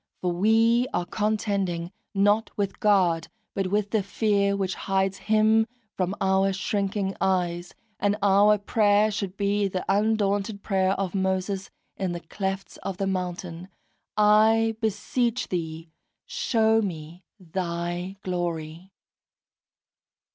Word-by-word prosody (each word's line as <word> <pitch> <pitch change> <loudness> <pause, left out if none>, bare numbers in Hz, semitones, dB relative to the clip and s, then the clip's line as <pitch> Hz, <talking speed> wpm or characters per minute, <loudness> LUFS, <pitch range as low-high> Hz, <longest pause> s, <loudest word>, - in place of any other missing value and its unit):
For 180 - 0
we 225 +6 +3
are 175 - 0
contending 200 -5 -1 0.2
not 205 +3 +3
with 200 -1 -2
God, 185 -7 +3 0.3
but 195 -1 -1
with 205 +1 0
the 220 - +2
fear 200 0 +1
which 190 -1 -1
hides 195 0 -1
Him 220 +1 +3 0.3
from 185 +1 -1
our 190 0 +2
shrinking 195 0 -1
eyes; 175 -2 0 0.2
and 205 0 +1
our 205 +1 +5
prayer 210 +1 +3
should 200 -2 -4
be 200 0 +1
the 185 -1 -4
undaunted 205 0 +1
prayer 190 -2 +1
of 195 -2 -3
Moses 190 0 -1 0.3
in 185 -2 -2
the 175 - -4
clefts 195 +3 -4
of 195 -2 -5
the 195 - -1
mountain, 180 -2 -4 0.5
"I 220 +2 +4
beseech 230 +3 -1
Thee, 165 -2 -4 0.3
show 225 -1 +2
me 170 -2 -6 0.2
Thy 175 +1 -4
Glory!" 170 -1 -4
195 Hz, 120 wpm, -26 LUFS, 180-210 Hz, 0.5 s, our